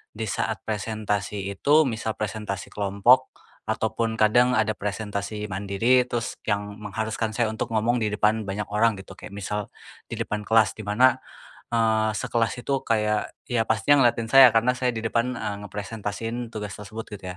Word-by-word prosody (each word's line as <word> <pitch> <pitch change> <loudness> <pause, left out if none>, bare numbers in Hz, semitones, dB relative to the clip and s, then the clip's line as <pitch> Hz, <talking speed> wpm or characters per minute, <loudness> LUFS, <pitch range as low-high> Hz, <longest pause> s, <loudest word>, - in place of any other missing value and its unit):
di 110 - -4
saat 110 +1 -2
presentasi 105 -2 -3
itu 145 +10 +4
misal 110 -4 -2
presentasi 105 -2 -4
kelompok 105 +6 +3 0.4
ataupun 115 -1 -1
kadang 120 +3 +4
ada 110 0 +2
presentasi 105 0 -4
mandiri, 100 +7 +2
terus 120 -2 -3
yang 105 0 -2
mengharuskan 110 +1 -3
saya 115 -3 +1
untuk 110 - -3
ngomong 120 +3 +2
di 110 - 0
depan 105 +1 +1
banyak 105 +1 -4
orang 110 +1 +3
gitu, 95 0 -12
kayak 100 - -10
misal 105 0 -3 0.4
di - - -5
depan 105 -1 -4
kelas 110 -2 +3
di 105 - -7
mana, 130 +5 +4 0.5
eee, 110 -2 +2
sekelas 115 +1 -1
itu 135 -1 0
kayak, 105 -1 0 0.2
ya 120 -2 +1
pastinya 115 +6 +3
ngeliatin 115 -1 +2
saya 130 +2 +8
karena 115 +3 +2
saya 125 0 0
di 115 -1 -4
depan, 120 +2 0
eee, 105 - -3
ngepresentasiin 110 +3 -5
tugas 105 -3 -6
tersebut 110 +2 -8
gitu 95 -2 -7
110 Hz, 160 wpm, -25 LUFS, 105-115 Hz, 0.5 s, saya